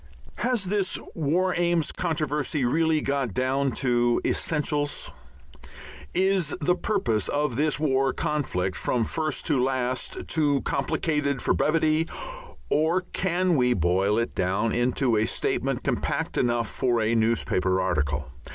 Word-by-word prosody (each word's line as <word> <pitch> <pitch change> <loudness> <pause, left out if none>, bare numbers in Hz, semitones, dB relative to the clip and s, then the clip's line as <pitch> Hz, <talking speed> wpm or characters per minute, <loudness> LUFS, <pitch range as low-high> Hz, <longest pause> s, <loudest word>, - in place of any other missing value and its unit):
Has 240 -4 0
this 195 0 0 0.2
War 175 +4 +1
Aims 175 -3 +1
controversy 150 -4 -1
really 160 +4 +2
got 135 -8 -1
down 135 +1 +1
to 120 -2 +2
essentials? 150 -2 -1 1.0
Is 190 -4 +2
the 160 +4 +2
purpose 120 - 0
of 145 -4 -1
this 150 +3 +1
world 135 -3 +1
conflict 95 -12 -1
from 120 -2 0
first 155 +6 -2
to 130 -3 +2
last 130 -1 -2
too 145 -4 +1
complicated 140 0 -1
for - - +1
brevity, 155 +1 +2 0.6
or 160 +5 +2
can 180 -1 +1
we 125 -3 +3
boil 95 +4 +2
it 115 0 -1
down 95 +5 0
into 120 0 +1
a 110 - +2
statement - - -1
compact - - -1
enough 120 -1 +1
for 120 -2 0
a 110 +1 +1
newspaper 110 -5 +1
article? 75 -5 -1
140 Hz, 130 wpm, -26 LUFS, 120-160 Hz, 1.0 s, we